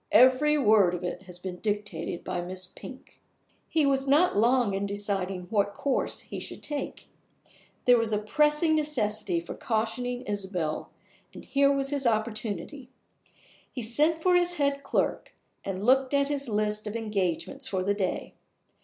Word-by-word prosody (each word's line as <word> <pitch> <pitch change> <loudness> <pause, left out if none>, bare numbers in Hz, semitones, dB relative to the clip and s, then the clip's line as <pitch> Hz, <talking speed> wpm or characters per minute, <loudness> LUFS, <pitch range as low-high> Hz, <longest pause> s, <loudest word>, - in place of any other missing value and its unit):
"Every 260 +6 +5
word 210 -9 +4
of 180 - -6
it 180 - -4
has 180 -1 -7
been 180 0 -6
dictated 205 -4 -3
by 175 - -3
Miss 185 +1 -4
Pink." 260 +8 -13 0.5
He 315 -3 +2
was 270 0 +1
not 305 +7 +4
long 235 0 +3
in 195 +1 -1
deciding 195 -2 -2
what 205 -2 +1
course 275 -2 -1
he - - -7
should - - -8
take. 295 -2 -5 0.8
There 245 -1 +6
was 230 -1 -1
a 210 - +2
pressing 300 +9 +2
necessity 215 - 0
for 170 - -7
cautioning 245 +2 -2
Isabel, 190 -6 -3 0.5
and - - -10
here 280 0 +3
was 275 0 0
his 280 -3 +1
opportunity. 225 +4 -2 0.8
He 250 - -5
sent 305 +8 +2
for 365 - +4
his 350 0 +3
head 280 -2 0
clerk, - - -1 0.3
and 195 +1 -4
looked 265 +2 +3
at 280 0 +2
his 280 -3 -1
list 210 0 0
of 210 - -5
engagements 200 -7 -2
for 190 -2 -1
the 200 +2 +1
day. 195 -3 -3
225 Hz, 160 wpm, -27 LUFS, 200-280 Hz, 0.8 s, There